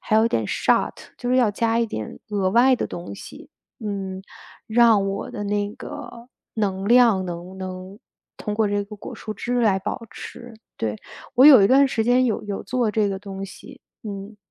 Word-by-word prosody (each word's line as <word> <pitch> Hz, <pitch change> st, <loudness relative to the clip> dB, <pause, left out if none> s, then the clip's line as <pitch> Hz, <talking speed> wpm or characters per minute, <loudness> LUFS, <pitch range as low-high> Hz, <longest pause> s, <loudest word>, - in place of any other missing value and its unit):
还 215 Hz, -, +1 dB
有 220 Hz, +1 st, +5 dB
点 115 Hz, -, 0 dB
shot， -, -, +1 dB, 0.2 s
就 245 Hz, -, -3 dB
是 255 Hz, -, +3 dB
要 245 Hz, -4 st, +4 dB
加 225 Hz, +2 st, 0 dB
一 235 Hz, -, +2 dB
点 110 Hz, -, -6 dB
额 195 Hz, -3 st, +1 dB
外 250 Hz, +5 st, +5 dB
的 -, -, -2 dB
东 170 Hz, -12 st, -7 dB
西， -, -, -12 dB, 0.3 s
嗯， 195 Hz, -2 st, -4 dB, 0.5 s
让 220 Hz, -3 st, +4 dB
我 195 Hz, -, -4 dB
的 205 Hz, -, -5 dB
那 205 Hz, 0 st, -1 dB
个 235 Hz, +2 st, -9 dB, 0.3 s
能 195 Hz, -3 st, -1 dB
量 235 Hz, -6 st, +5 dB
能 175 Hz, +1 st, -7 dB
能 185 Hz, +1 st, -7 dB, 0.4 s
通 210 Hz, -, -4 dB
过 220 Hz, 0 st, +2 dB
这 205 Hz, 0 st, 0 dB
个 210 Hz, +1 st, -10 dB
果 -, -, -8 dB
蔬 215 Hz, -, -6 dB
汁 245 Hz, +4 st, -1 dB
来 205 Hz, -4 st, +3 dB
保 190 Hz, -, -4 dB
持， 240 Hz, 0 st, -10 dB, 0.2 s
对。 110 Hz, -1 st, -2 dB, 0.4 s
我 255 Hz, +3 st, +7 dB
有 265 Hz, -9 st, +10 dB
一 -, -, +6 dB
段 275 Hz, +3 st, +6 dB
时 230 Hz, -4 st, 0 dB
间 250 Hz, +2 st, +4 dB
有 225 Hz, -, -1 dB
有 205 Hz, -1 st, -4 dB
做 245 Hz, -3 st, 0 dB
这 210 Hz, -1 st, +1 dB
个 195 Hz, -, -2 dB
东 195 Hz, -1 st, -7 dB
西， 195 Hz, -, -13 dB, 0.2 s
嗯。 205 Hz, 0 st, -7 dB
210 Hz, 220 characters per minute, -23 LUFS, 195-235 Hz, 0.5 s, 有